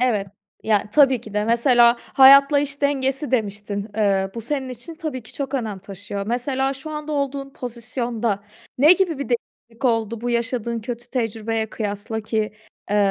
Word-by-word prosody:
Evet. 220 -6 +1 0.4
Ya, 210 -1 +1
tabii 270 -2 +5
ki 215 -2 -11
de. 210 - +1
Mesela, 235 +1 +5
hayatla 275 +2 +7
iş 285 0 -2
dengesi 275 0 0
demiştin, 205 -3 -2
ııı, 195 -2 +2
bu 230 - -4
senin 265 +2 -3
için 255 +7 -8
tabii 310 -7 -5
ki - - -12
çok 275 -1 -4
önem 220 -6 -2
taşıyor. 200 +1 -6
Mesela, 265 +3 -1
şu 275 +4 -9
anda 300 0 -5
olduğun 280 -1 -2
pozisyonda 235 -4 -3 0.4
ne 305 +6 +8
gibi 360 -5 +1
bir 280 - -4
değişiklik 235 0 -5
oldu, 225 -2 +1
bu 245 +1 -2
yaşadığın 235 -1 -1
kötü 240 +1 -7
tecrübeye 225 -2 -2
kıyasla 210 +1 -3
ki, 220 +1 -4 0.5
eee, 210 - +2
240 Hz, 165 wpm, -22 LUFS, 220-275 Hz, 0.5 s, ne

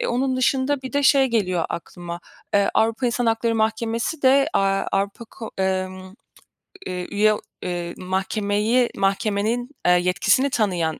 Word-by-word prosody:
Eee, - - -1
onun 255 +2 0
dışında 265 +2 +1
bir 260 - -7
de 285 0 +1
şey 270 0 +5
geliyor 185 -8 0
aklıma. 175 0 -7 0.3
Eee, 200 0 +4
Avrupa 230 +3 +2
İnsan 240 0 0
Hakları 225 0 +1
Mahkemesi 225 +6 -1
de, 275 +2 +5
aaa, 195 0 +1
Avrupa, 200 +4 -1
ko 225 0 -9
emm, 185 0 -2 0.7
eee, 180 -1 -4
üye, 215 +1 +3 0.3
eee, 175 -1 -4
mahkemeyi 205 +5 0
mahkemenin, 215 +4 0 0.2
eee, 180 - +5
yetkisini 180 +10 +3
tanıyan 180 -9 0
215 Hz, 140 wpm, -22 LUFS, 185-245 Hz, 0.7 s, şey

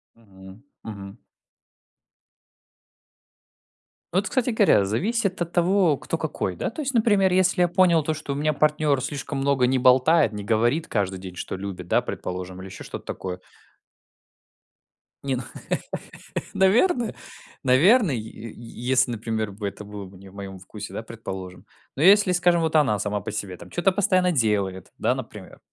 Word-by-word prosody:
Мгм 95 -1 -15 0.2
мгм. 100 0 -8 3.0
Вот, 195 +3 +1
кстати 255 -1 +1
говоря, 200 - +4
зависит 190 - -1
от 170 - -2
того, 175 -4 +3
кто 165 - -3
какой, 145 - -3
да, - - -2
то 275 +7 -6
есть, 275 -2 -2
например, 205 -5 +3
если 185 0 +3
я 175 - +4
понял 175 -3 +4
то, 155 - 0
что 155 -2 -6
у - - -1
меня 155 +1 +1
партнер 150 -2 +2
слишком 140 +1 -4
много 135 -2 +2
не 130 0 +2
болтает, 130 +2 +5
не 105 -1 -6
говорит 120 +9 +1
каждый 95 -3 -1
день, 90 -1 -9
что 95 - -5
любит, 95 -2 -7
да, - - +3
предположим, 90 0 -6
или 95 - -8
еще 95 - -10
что-то - - -7
такое 90 -1 -5 1.8
Не, 135 -2 0
ну, 125 - -4 1.1
наверное, 235 - +3 0.5
наверное, 160 - +5
й - - -2 0.4
й 115 0 -11
если 130 -1 +3
например 110 -2 -3
бы, 100 +1 -5
это 100 - -7
было 105 -1 -8
бы 95 0 -14
не 95 0 -13
в - - -18
моем 95 -1 -7
вкусе, 105 +3 -9
да, 110 - -5
предположим. 95 -5 -8 0.3
Но 140 - -3
если 200 0 +6
скажем 175 -1 +3
вот 160 -1 -1
она 135 -9 +4
сама 105 0 -2
по 105 - -5
себе 100 -3 -4
там - - -12
чё-то 180 +2 +2
постоянно 185 -1 +2
делает, 100 - 0
да, - - +1
например. - - -9
130 Hz, 165 wpm, -24 LUFS, -, 3.0 s, если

